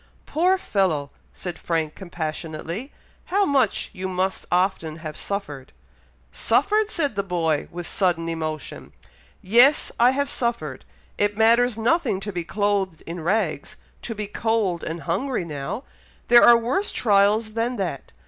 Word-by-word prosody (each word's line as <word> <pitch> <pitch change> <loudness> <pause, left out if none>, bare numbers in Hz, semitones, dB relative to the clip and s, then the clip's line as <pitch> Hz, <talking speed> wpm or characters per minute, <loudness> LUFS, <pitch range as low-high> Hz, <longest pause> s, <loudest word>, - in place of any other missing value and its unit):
"Poor 360 +5 +2
fellow!" 170 - 0 0.2
said 175 -3 -7
Frank, 160 -2 -1
compassionately; 170 - -5 0.3
"how 400 +2 +2
much 265 - +1
you 185 +1 -4
must 185 +1 -2
often 180 -3 +1
have 155 -2 -7
suffered!" 150 -10 -5 0.6
"Suffered!" 425 0 +2
said 290 - -1
the 200 - +1
boy, 165 -5 -1
with 175 0 -6
sudden 175 -3 0
emotion. 155 -2 -5 0.5
"Yes! 240 +9 +5
I 240 +1 +6
have 280 +2 0
suffered! 235 - -2 0.3
It 205 0 +1
matters 230 +1 +4
nothing 230 - +1
to 205 - -4
be 175 -1 -3
clothed 195 -2 -1
in 170 +1 -6
rags, 195 +7 -1 0.3
to 230 - -5
be 210 0 -3
cold 205 -5 -1
and 165 +1 -5
hungry 195 +4 -1
now! 150 - -5 0.5
There 240 0 +8
are 240 0 +8
worse 255 - -1
trials 210 0 +2
than 230 +2 -1
that! 175 - -4
200 Hz, 140 wpm, -23 LUFS, 165-235 Hz, 0.6 s, There